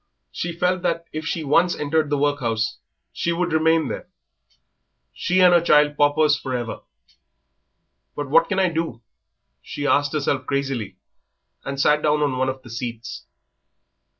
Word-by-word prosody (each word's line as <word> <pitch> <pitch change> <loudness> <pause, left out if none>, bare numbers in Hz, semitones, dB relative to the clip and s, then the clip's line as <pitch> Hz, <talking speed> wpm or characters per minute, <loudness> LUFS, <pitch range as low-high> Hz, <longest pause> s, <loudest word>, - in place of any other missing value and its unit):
She 170 - -4
felt 180 +1 +1
that 170 -1 -1
if 155 +1 -4
she 165 - -2
once 170 +5 +3
entered 150 +1 0
the 145 - +1
workhouse 125 -6 -1 0.3
she 170 - -1
would 175 0 -1
remain 160 0 +3
there. - - -6 1.1
She 185 +1 +1
and 180 -1 +7
her 175 - +5
child 150 -3 +4
paupers 145 +1 +3
for 130 -3 -4
ever. 120 -2 -5 1.4
"But 145 -1 -4
what 165 +4 +4
can 190 - -1
I 190 -1 +3
do?" 160 -8 -4 0.6
she 145 - -6
asked 145 +1 +2
herself 140 -3 -1
crazily, 135 -9 -2 0.7
and 140 0 -5
sat 150 +2 +3
down 150 0 +2
on 140 -3 0
one 130 0 +1
of 130 0 -6
the 120 - -12
seats. 120 0 -6
150 Hz, 155 wpm, -22 LUFS, 135-165 Hz, 1.4 s, and